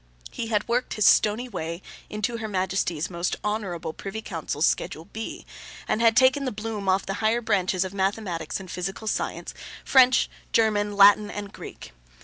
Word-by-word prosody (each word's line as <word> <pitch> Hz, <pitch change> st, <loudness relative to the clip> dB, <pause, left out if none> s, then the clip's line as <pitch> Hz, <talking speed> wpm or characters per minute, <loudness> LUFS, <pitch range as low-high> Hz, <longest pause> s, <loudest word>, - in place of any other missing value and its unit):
He 230 Hz, -, -4 dB
had 210 Hz, -2 st, 0 dB
worked 245 Hz, +2 st, -1 dB
his 215 Hz, -, +2 dB
stony 220 Hz, +4 st, +4 dB
way 170 Hz, -5 st, -5 dB, 0.3 s
into 215 Hz, +3 st, -2 dB
Her 220 Hz, -1 st, -4 dB
Majesty's 185 Hz, -4 st, -1 dB
most 170 Hz, 0 st, -2 dB
Honourable 200 Hz, -7 st, -3 dB
Privy 215 Hz, +5 st, -6 dB
Council's 160 Hz, -3 st, -2 dB
Schedule 160 Hz, -, -1 dB
B, 220 Hz, +4 st, -7 dB, 0.4 s
and 215 Hz, -, 0 dB
had 230 Hz, 0 st, +4 dB
taken 260 Hz, +2 st, +5 dB
the 260 Hz, -, -1 dB
bloom 210 Hz, -2 st, -4 dB
off 190 Hz, +1 st, +2 dB
the 195 Hz, -, -3 dB
higher 220 Hz, +2 st, +2 dB
branches 185 Hz, -4 st, +1 dB
of 190 Hz, -, -6 dB
mathematics 190 Hz, -4 st, -2 dB
and 185 Hz, -2 st, -9 dB
physical 190 Hz, +4 st, -4 dB
science, 215 Hz, -, -3 dB, 0.3 s
French, 260 Hz, -1 st, +5 dB, 0.3 s
German, 205 Hz, -2 st, +2 dB
Latin, 205 Hz, +1 st, +7 dB
and 205 Hz, -1 st, -6 dB
Greek. -, -, -10 dB
205 Hz, 165 wpm, -25 LUFS, 185-225 Hz, 0.4 s, Latin